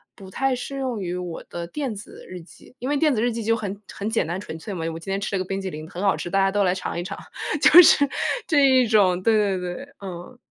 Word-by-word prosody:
不 190 -1 -12
太 270 +7 0
适 275 +3 -6
用 255 -5 -2
于 180 -1 -3
我 180 -2 -5
的 170 0 -5
电 270 - -4
子 205 - -11
日 180 -1 -8
记， 170 +8 -18
因 255 - -4
为 290 - +1
电 300 -2 +3
子 215 - 0
日 240 +1 +1
记 230 - -4
就 230 +1 +2
很 205 -2 -5
很 205 +2 -4
简 225 -7 0
单 175 +3 -3
纯 160 -5 -8
粹 200 +5 -7
嘛， 165 -3 -4
“我 165 - -6
今 195 - -10
天 195 - 0
吃 200 0 -3
了 - - 0
个 - - -3
冰 195 0 -3
淇 190 - -4
淋 155 -1 -8
很 180 - -6
好 195 - +3
吃， - - -5
大 195 - 0
家 195 0 +2
都 205 0 +2
来 180 0 +2
尝 180 -2 -4
一 - - -3
尝”， 185 - -6 0.5
就 355 +3 +10
是 285 -3 +6 0.4
这 285 -3 +4
一 260 -1 +5
种 190 -4 +3
对 225 -1 +4
对 200 -3 +1
对， 180 +10 -6 0.2
嗯。 185 +5 -8
200 Hz, 305 characters per minute, -23 LUFS, 180-245 Hz, 0.5 s, 就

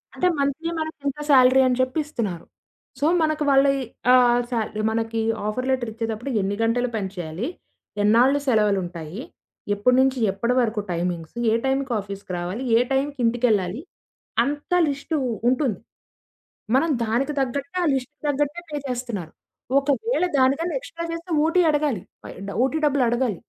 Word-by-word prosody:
అంటే 365 - +2
మంత్లీ 280 +4 -1
మనకింత 300 -3 -4
సాలరీ 260 -1 +6
అని 250 - +1
చెప్పి 255 +5 0
ఇస్తున్నారు. 210 - -4 0.5
సో, 290 - +1 0.2
మనకు 310 -1 +1
వాళ్ళ 275 0 +5 0.5
ఆహ్, 245 -1 +5
సాల్ 225 -4 -2 0.2
మనకి 225 0 -1 0.3
ఆఫర్ 255 +5 -2
లెటర్ 255 -3 0
ఇచ్చేటప్పుడు 225 +3 -4
ఎన్ని 200 +1 -1
గంటలు 245 +2 +1
పని 195 -3 -2
చేయాలి? 175 - -4 0.6
ఎన్నాళ్లు 245 +7 +4
సెలవులుంటాయి? 190 -5 0 0.5
ఎప్పటి 250 +5 +3
నుంచి 265 0 +2
ఎప్పటి 235 +5 -1
వరకు 220 -2 0
టైమింగ్స్? 170 +1 -3 0.2
ఏ - - +3
టైంకి 270 -1 0
ఆఫీసు‌కి 200 -1 -7
రావాలి? 180 +8 -4 0.2
ఏ - - +4
టైంకి 280 +1 0
ఇంటికెళ్ళాలి? 230 -2 +1 0.6
అంతా 290 +6 -1
లిస్టు 285 +3 -2 0.3
ఉంటుంది. 250 -6 0 1.0
మనం 325 +5 +2
దానికి 245 +7 0
తగ్గట్టే 280 +7 -2
ఆ - - +2
లిస్ట్‌కి 265 +2 -5
తగ్గట్టే 295 +4 -1
పే 295 - -2
చేస్తున్నారు. 240 -10 -4 0.5
ఒకవేళ 360 - 0
దానికన్నా 280 +7 +2
ఎక్స్‌స్ట్రా 335 -9 -7
చేస్తే 335 +2 -7
ఓటీ 345 +3 +3
అడగాలి. 290 -10 0 0.2
పై - - -8 0.2
డ - - -3
ఓటీ 300 +4 0
డబ్బులడగాలి. 245 - +1
255 Hz, 140 wpm, -23 LUFS, 220-285 Hz, 1.0 s, సాలరీ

